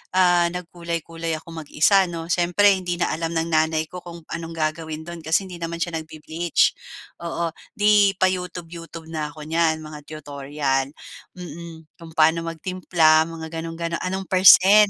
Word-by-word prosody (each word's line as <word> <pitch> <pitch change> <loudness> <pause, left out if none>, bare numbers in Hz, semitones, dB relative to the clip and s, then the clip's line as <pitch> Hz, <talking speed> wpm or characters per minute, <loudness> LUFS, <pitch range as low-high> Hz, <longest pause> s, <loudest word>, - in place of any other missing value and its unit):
ah, 175 -2 +5
nagkulay-kulay 170 -2 -4
ako 160 +1 -12
mag-isa 165 +4 +3
'no. 165 -1 -5
Siyempre 180 +4 +4
hindi 180 -2 -2
na 175 - 0
alam 165 +1 -3
ng 165 +1 0
nanay 160 0 +2
ko 180 - -6
kung 170 -1 -10
anong 165 0 -5
gagawin 155 0 -3
do'n 170 0 -7
kasi 160 +5 +1
hindi 180 -2 -9
naman 170 0 -3
siya 165 -2 -3
nagbe-bleach. 160 +1 0 0.5
Oo. 170 0 -2 0.2
'Di 205 -1 +4
pa-youtube-youtube 175 -3 -3
na 155 -2 -3
ako 150 0 -10
niyan, 160 0 +1
mga 155 -1 -9
tutorial. 140 -2 -2 0.5
Mm, 170 -1 -9
kung 165 -1 -12
paano 160 +1 +4
magtimpla 165 -2 +2
mga 165 -1 -7
gano'n-gano 165 +1 -4
anong 190 +1 -3
%? 190 +3 +7
165 Hz, 150 wpm, -23 LUFS, 160-175 Hz, 0.5 s, %?